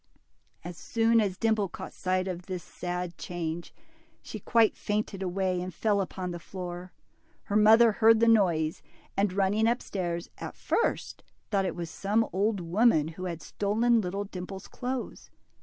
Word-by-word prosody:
As 175 0 -7
soon 230 0 +3
as 195 -3 -1
Dimple 220 -3 +1
caught - - -8
sight 185 0 -1
of 180 -1 -5
this 180 -3 -4
sad 180 -1 -5
change, 170 -1 -4 0.5
she 215 - -7
quite 225 +2 +3
fainted 210 -2 -2
away 185 -1 -1
and 185 +1 -4
fell 205 +3 +1
upon 185 -1 -4
the 175 - -5
floor. 180 +1 -7 0.5
Her 205 - -3
mother 220 +2 +7
heard 225 +1 +5
the 230 - +4
noise, 170 -8 +3 0.3
and 200 -1 +2
running 200 +3 +2
up 240 +2 +2
stairs, 175 -3 -3
at - - -6
first 465 - -1 0.3
thought 195 -2 +2
it - - -2
was 170 -2 -5
some 210 +5 +1
old 200 +1 +1
woman 170 -2 +3
who 180 +3 -7
had 170 -2 -5
stolen 225 +3 +2
little 195 +1 -3
Dimple's 190 0 -7
clothes. 255 0 -5
190 Hz, 160 wpm, -28 LUFS, 180-220 Hz, 0.5 s, mother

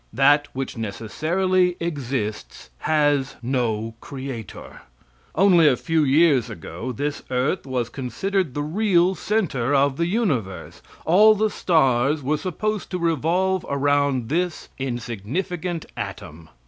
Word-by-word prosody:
That 145 +4 +4
which 135 -2 -4
necessarily 175 - 0
exists 130 - -4
has 145 -3 +1
no 115 -3 -1
creator. 130 -5 -8 0.5
Only 175 -3 +5
a 130 -4 +4
few 165 -2 +1
years 140 -3 +4
ago 105 +4 -6
this 145 +5 -3
earth 130 +5 -1
was 125 -3 -1
considered 150 - -2
the 145 - -1
real 180 +2 +2
center 150 - 0
of 140 0 +2
the 170 - +1
universe; 145 - -2 0.2
all 210 +6 +6
the 215 0 +1
stars 140 -3 +2
were 150 +4 +1
supposed 205 +6 -3
to 185 - -2
revolve 170 +3 +1
around 140 -3 +1
this 175 +2 -2
insignificant 135 - -3
atom. 85 -5 -7
145 Hz, 120 wpm, -23 LUFS, 125-175 Hz, 0.5 s, all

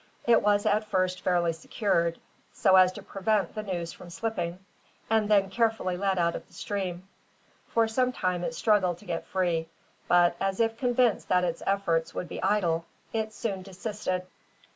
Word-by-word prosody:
It 235 -1 +5
was 205 0 +2
at 215 +1 +2
first 185 -2 0
fairly 175 -2 +2
secured, 170 0 0 0.4
so 190 - +4
as 185 -1 +7
to - - -9
prevent 195 -2 0
the 215 - -3
noose 175 -5 -4
from 175 - -12
slipping, 175 -3 -3 0.5
and 220 -1 +2
then 200 -2 +3
carefully 225 -5 +1
led 190 +1 0
out 170 -1 +1
of - - -7
the - - -25
stream. 190 -3 -4 0.6
For 230 -1 +2
some 250 +3 +1
time 185 -6 -1
it 245 - -3
struggled 195 -7 +2
to 205 - -17
get 170 -3 -4
free, 170 -3 0 0.4
but, 175 -1 +4
as 195 +1 -1
if 225 0 +2
convinced 245 -1 +1
that 180 0 +3
its 170 -2 -2
efforts 170 -5 0
would 180 - -3
be - - -6
idle, 175 -5 +1 0.3
it 220 -1 -1
soon 205 -3 -3
desisted. 190 -1 -4
190 Hz, 175 wpm, -28 LUFS, 175-215 Hz, 0.6 s, as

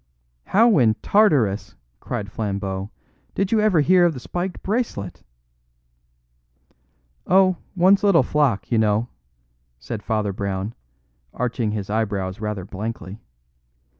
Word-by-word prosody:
"How 225 -3 +4
in 110 -3 +4
Tartarus," 145 - +2 0.2
cried 100 -2 -5
Flambeau, 100 -2 -3 0.5
"did 195 0 -1
you 225 - +3
ever 210 -7 +3
hear 180 +4 +4
of 170 -3 +2
the - - -6
spiked 175 +7 -5
bracelet?" 200 - -3 2.1
"Oh, 185 -1 +4 0.2
one's 190 +3 +4
little 200 -5 +5
flock, 130 -11 0
you 115 - +3
know!" 110 +2 +1 0.7
said 100 - -6
Father 105 -3 -1
Brown, 100 +2 -3 0.6
arching 120 -2 -1
his 105 -2 -4
eyebrows 100 -3 -2
rather 105 -4 -3
blankly. 105 0 -6
115 Hz, 115 wpm, -22 LUFS, -, 2.1 s, little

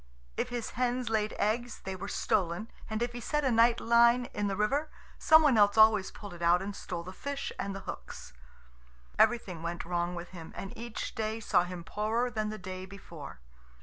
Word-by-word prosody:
If - - -1
his 240 -2 -4
hens 250 0 -1
laid 215 -1 +1
eggs, 230 +3 -1
they 190 0 -4
were 195 +2 -6
stolen; 190 +1 -1 0.2
and 220 +1 -1
if 240 - -2
he 240 - -5
set 295 +5 -1
a 260 - +3
night 235 +1 +5
line 235 +1 +5
in 205 0 -1
the 195 - -1
river, 275 +10 0 0.3
some 315 -2 +7
one 265 -7 +5
else 205 +1 +5
always 215 -3 +6
pulled 205 -3 -10
it 175 - -11
out 170 +1 +5
and 195 +1 -5
stole 175 -4 -5
the 185 +2 -8
fish 280 +7 -4
and 200 0 -3
the 195 - -6
hooks. - - -8 0.9
Everything 190 -9 +2
went 170 0 -4
wrong 175 0 -1
with 175 0 -6
him, 170 -3 -10
and 195 - -7
each 235 0 -5
day 220 0 -2
saw 180 -5 +2
him 180 -1 -7
poorer 225 +6 -1
than 215 -2 -2
the 215 - -5
day 185 0 -7
before. 165 - -10
210 Hz, 205 wpm, -30 LUFS, 185-235 Hz, 0.9 s, some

